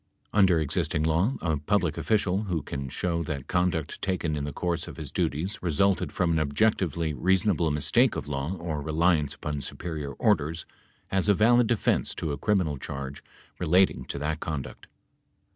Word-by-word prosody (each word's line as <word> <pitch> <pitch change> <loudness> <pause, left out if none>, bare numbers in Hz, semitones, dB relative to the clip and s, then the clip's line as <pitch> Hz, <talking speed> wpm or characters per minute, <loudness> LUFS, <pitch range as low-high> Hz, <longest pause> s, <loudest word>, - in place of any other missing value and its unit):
Under 95 -5 +5
existing 80 +1 0
law, 85 +11 +2
a 80 -3 0
public 85 +1 0
official, 100 -2 +1
who 85 -6 -2
can 70 -1 -5
show 85 +4 -1
that 75 -4 -4
conduct 90 -4 -1
taken 90 -5 -1
in 75 -1 -2
the 75 - -4
course 85 +1 -2
of - - -9
his - - -6
duties 85 +9 -1
resulted 90 +3 +1
from 90 -2 +1
an 80 - +2
objec 80 +9 +2
tively 85 -3 -1
reasonable 95 -1 +2
mistake 75 -1 +2
of - - -4
law 75 +5 -2
or 85 -4 -4
reliance 80 -1 +1
upon 75 -3 -4
superior 75 -1 -5
orders, 75 +4 +1 0.4
has 95 +1 +1
a 100 - +6
valid 120 +3 +5
defense 120 -2 +1
to 80 - -3
a 70 - -3
criminal 90 -9 +1
charge 70 +1 -6 0.4
relating 90 +4 +3
to - - -5
that 75 +2 -2
conduct. 75 -6 -5
80 Hz, 170 wpm, -27 LUFS, 75-95 Hz, 0.4 s, a